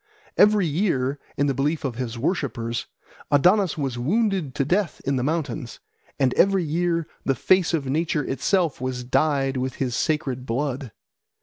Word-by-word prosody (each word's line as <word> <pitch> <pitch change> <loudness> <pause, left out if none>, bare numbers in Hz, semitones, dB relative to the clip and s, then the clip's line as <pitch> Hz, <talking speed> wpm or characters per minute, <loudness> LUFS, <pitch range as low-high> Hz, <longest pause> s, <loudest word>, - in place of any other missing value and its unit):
Every 210 -2 +5
year, 145 -5 0 0.2
in 145 - +2
the 140 - +1
belief 145 +3 -1
of 130 - -1
his 120 -2 -4
worshippers, 120 - -2 0.4
Adonis 180 +5 +4
was 135 -5 -2
wounded 190 - 0
to 140 - 0
death 180 +3 0
on 140 - +2
the 125 - 0
mountains, 145 -3 -3 0.4
and 130 -2 +3
every 195 -1 +3
year 170 +1 0 0.2
the 135 - +1
face 185 +7 +3
of 160 -5 -1
nature 150 +2 0
itself 165 +1 0
was 130 -1 -3
dyed 135 +1 +1
with 130 +1 -2
his 125 -3 -2
sacred 135 -5 -1
blood. 130 0 -2
145 Hz, 160 wpm, -24 LUFS, 130-170 Hz, 0.4 s, Every